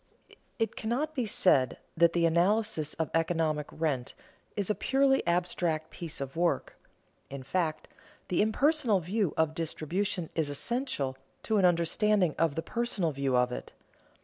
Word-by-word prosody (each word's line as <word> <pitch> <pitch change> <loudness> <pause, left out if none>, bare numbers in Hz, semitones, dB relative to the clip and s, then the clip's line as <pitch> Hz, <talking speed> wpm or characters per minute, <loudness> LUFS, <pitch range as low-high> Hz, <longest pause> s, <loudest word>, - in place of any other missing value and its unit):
It 225 -2 -1
cannot 260 +8 -2
be 250 -6 -1
said 140 -10 +3 0.2
that 170 0 +4
the 170 -1 +2
analysis 170 -1 +1
of 160 - -2
economic 165 -2 0
rent 145 -6 -2 0.4
is 200 -2 0
a 210 - +2
purely 270 +3 +2
abstract 170 -2 0
piece 165 -2 -7
of 135 -1 -5
work. 170 +1 0 0.5
In 135 -1 -7
fact, 155 +2 -1 0.4
the 180 - +2
impersonal 240 0 +3
view 190 +1 -1
of 160 -1 +2
distribution 170 +3 -2
is 160 -3 0
essential 145 - -2 0.3
to 220 - +1
an 195 - +4
understanding 180 +1 +2
of 165 -4 +2
the 165 - -2
personal 220 -6 -1
view 135 -2 0
of 125 0 +2
it. - - -7
170 Hz, 150 wpm, -29 LUFS, 155-210 Hz, 0.5 s, that